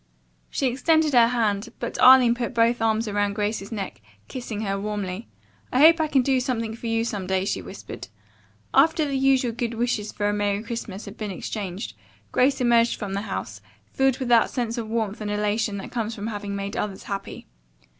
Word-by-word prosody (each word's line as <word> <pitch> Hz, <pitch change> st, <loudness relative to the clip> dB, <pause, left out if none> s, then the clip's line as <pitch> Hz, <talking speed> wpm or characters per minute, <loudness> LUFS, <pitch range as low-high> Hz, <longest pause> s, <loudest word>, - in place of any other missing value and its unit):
She -, -, -1 dB
extended 300 Hz, +4 st, +2 dB
her 235 Hz, -2 st, +7 dB
hand, 225 Hz, -2 st, 0 dB
but -, -, -4 dB
Arline 255 Hz, -2 st, +8 dB
put 240 Hz, 0 st, -4 dB
both 230 Hz, 0 st, +3 dB
arms 225 Hz, 0 st, +1 dB
around 205 Hz, -1 st, 0 dB
Grace's 205 Hz, -1 st, -2 dB
neck, 200 Hz, -, -5 dB, 0.3 s
kissing 240 Hz, -5 st, -5 dB
her 195 Hz, -2 st, -2 dB
warmly. 205 Hz, 0 st, -4 dB, 0.4 s
"I -, -, 0 dB
hope 325 Hz, +1 st, +7 dB
I 315 Hz, -, +1 dB
can 270 Hz, -4 st, +3 dB
do 265 Hz, 0 st, +2 dB
something 230 Hz, -4 st, -2 dB
for 230 Hz, -, -7 dB
you 225 Hz, 0 st, +1 dB
some 205 Hz, -5 st, -4 dB
day," 190 Hz, 0 st, 0 dB
she 95 Hz, -, -1 dB
whispered. 90 Hz, -, -9 dB, 0.7 s
After 315 Hz, +3 st, +4 dB
the 280 Hz, -, -3 dB
usual 265 Hz, -2 st, +3 dB
good 235 Hz, 0 st, -3 dB
wishes 230 Hz, -3 st, -1 dB
for 205 Hz, -, -1 dB
a 205 Hz, -, +1 dB
Merry 205 Hz, 0 st, 0 dB
Christmas 225 Hz, -4 st, -6 dB
had 200 Hz, +1 st, -10 dB
been 215 Hz, -1 st, -4 dB
exchanged, 195 Hz, 0 st, -5 dB, 0.4 s
Grace 270 Hz, +2 st, +3 dB
emerged 235 Hz, -1 st, +3 dB
from 205 Hz, -3 st, -5 dB
the 200 Hz, -, -1 dB
house, -, -, -5 dB, 0.3 s
filled 270 Hz, -1 st, +2 dB
with 255 Hz, -2 st, -3 dB
that 235 Hz, -2 st, +5 dB
sense 235 Hz, -2 st, -2 dB
of 220 Hz, -2 st, -5 dB
warmth 220 Hz, -2 st, -2 dB
and 210 Hz, -, -3 dB
elation 210 Hz, 0 st, 0 dB
that 195 Hz, -, -7 dB
comes 225 Hz, -2 st, -2 dB
from 205 Hz, -, -6 dB
having 205 Hz, -2 st, -4 dB
made 200 Hz, 0 st, -4 dB
others 200 Hz, -2 st, -3 dB
happy. 200 Hz, -1 st, -6 dB
225 Hz, 195 wpm, -24 LUFS, 205-245 Hz, 0.7 s, Arline